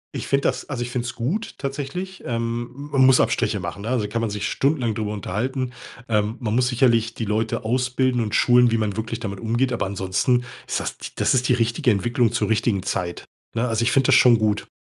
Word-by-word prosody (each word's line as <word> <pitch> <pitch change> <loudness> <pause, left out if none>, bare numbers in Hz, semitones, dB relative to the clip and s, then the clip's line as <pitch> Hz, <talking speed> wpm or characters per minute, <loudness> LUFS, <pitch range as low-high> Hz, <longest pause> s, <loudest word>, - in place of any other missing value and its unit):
Ich - - -4
finde 140 0 +1
das - - -3
also 130 -4 -3
ich 120 0 -4
find's 120 -1 -3
gut, 165 - -3
tatsächlich. 145 +7 -5
Ähm, 115 0 -2 0.2
man 130 -1 +5
muss 130 -1 +6
Abstriche 105 - +1
machen, 90 +2 -6
ne? 110 - -4
Also 120 -5 0
kann 115 +3 -2
man 115 - -1
sich 105 0 -3
stundenlang 135 -6 0
drüber 105 -1 -2
unterhalten. 125 +6 -3 0.3
Ähm, 110 +1 0
man 110 -4 -1
muss 125 0 +2
sicherlich 120 -2 +2
die 115 - -3
Leute 110 +1 -1
ausbilden 125 +1 +1
und 105 -1 -3
schulen, 120 -1 +5
wie 115 - +2
man 105 -3 -1
wirklich 110 +1 -4
damit 100 -4 -5
umgeht, 120 +3 0
aber 115 - -1
ansonsten 100 +6 0 0.2
ist - - -1
das - - -4 0.2
das - - +2
ist 130 0 +1
die - - +5
richtige 115 +1 +1
Entwicklung 120 +3 +1
zur 115 - 0
richtigen 110 -3 +1
Zeit, 90 -3 -3 0.3
ne? 115 +2 +1
Also 115 0 0
ich 115 - +2
finde 135 -1 +3
das 135 - +6
schon 120 -3 +6
gut. 105 -1 0
115 Hz, 220 wpm, -23 LUFS, 110-125 Hz, 0.3 s, muss